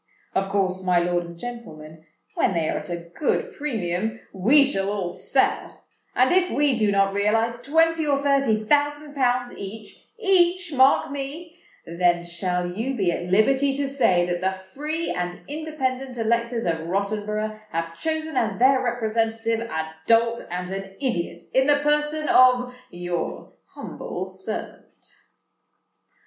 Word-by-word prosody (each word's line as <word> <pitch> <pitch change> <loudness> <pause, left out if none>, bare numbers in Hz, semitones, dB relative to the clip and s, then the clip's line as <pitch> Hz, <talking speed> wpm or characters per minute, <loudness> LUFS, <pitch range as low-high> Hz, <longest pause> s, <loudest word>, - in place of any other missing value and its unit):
Of 195 0 0
course, 190 -2 0
my 180 -1 +3
lord 175 0 +1
and 170 0 -10
gentlemen, 160 -9 -9 0.3
when 190 - +1
they 165 -2 +1
are - - -1
at - - -10
a 175 - -2 0.2
good 465 - -1
premium, 220 - -2
we 240 +10 +5
shall 195 -8 -1
all 200 -4 -2
sell; - - -1 0.3
and - - +4
if 365 0 +3
we 285 -2 +2
do 215 -3 +2
not 195 0 +2
realise 225 +4 +1
twenty 325 +3 +2
or 280 -1 +2
thirty 275 -6 +2
thousand 290 +3 +1
pounds 250 -3 0
each—each, 350 - -1
mark 270 +1 +4
me—then 275 - -3
shall 175 +1 -2
you 230 +8 -3
be 190 -7 +1
at 175 - -3
liberty 270 +7 +3
to 280 0 -1
say 190 -11 +2
that 175 0 -2
the 190 +1 +1
free 290 - -4
and 180 0 -3
independent 270 -4 -3
electors 235 +1 0
of 165 -2 0
Rottenborough 210 +3 -2
have 165 -3 -3
chosen 315 - -3
as 215 -5 0
their 260 +2 +4
representative 225 -1 0
a 160 -9 -4
dolt 230 +1 +3
and 180 +1 -4
an 195 0 -6
idiot 175 -10 -2
in 265 +1 +3
the 290 -1 +5
person 300 +1 +1
of 250 0 +5 0.2
your 175 -1 -4 0.2
humble - - -6
servant." - - -7
230 Hz, 145 wpm, -24 LUFS, 185-275 Hz, 0.3 s, we